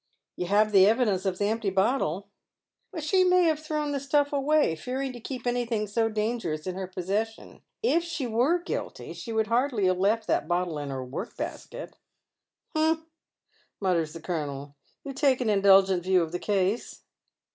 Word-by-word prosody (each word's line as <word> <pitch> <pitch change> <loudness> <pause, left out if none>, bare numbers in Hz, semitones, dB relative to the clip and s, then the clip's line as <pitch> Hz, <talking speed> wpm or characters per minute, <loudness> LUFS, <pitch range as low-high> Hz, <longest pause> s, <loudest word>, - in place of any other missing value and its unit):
" - - -62
You 180 - -3
have 210 +3 +3
the 195 -1 +7
evidence 210 -4 +2
of 185 -1 -1
the 205 - 0
empty 220 -1 0
bottle? 195 - 0 0.2
" - - -64
" 360 - -10
She 370 +5 +3
may 365 0 +4
have 315 -3 +2
thrown 305 -1 -2
the 280 - -1
stuff 285 +1 +1
away, 285 - +2
fearing 260 - -4
to 240 - -9
keep 250 +1 -6
any 245 0 +1
thing 225 -3 -1
so 225 +2 0
dangerous 210 -8 -2
in 185 - -3
her 190 0 -5
possession. 200 +5 -4 0.2
If 340 -7 +3
she 330 -5 -3
were 245 +9 +2
guilty, 350 - -5
she 230 - -7
^ould 220 -1 +1
hardly 235 -2 +1
have 185 0 +2
left 215 +3 +2
that 150 - 0
bottle 175 -2 -1
in 145 -1 -5
her 130 -1 -4
work 140 - -6
basket." - - -7 0.4
" - - -47
Humph," 315 +1 +2 0.8
mutters 170 -5 0
the 165 - -9
colonel. 145 -4 -4 0.3
"You 275 - -6
take 270 -2 +2
an 235 -4 +1
indulgent 195 -2 +5
view 185 0 +3
of 160 - -5
the 175 - -3
case." 200 +2 -1
215 Hz, 190 wpm, -27 LUFS, 185-270 Hz, 0.8 s, the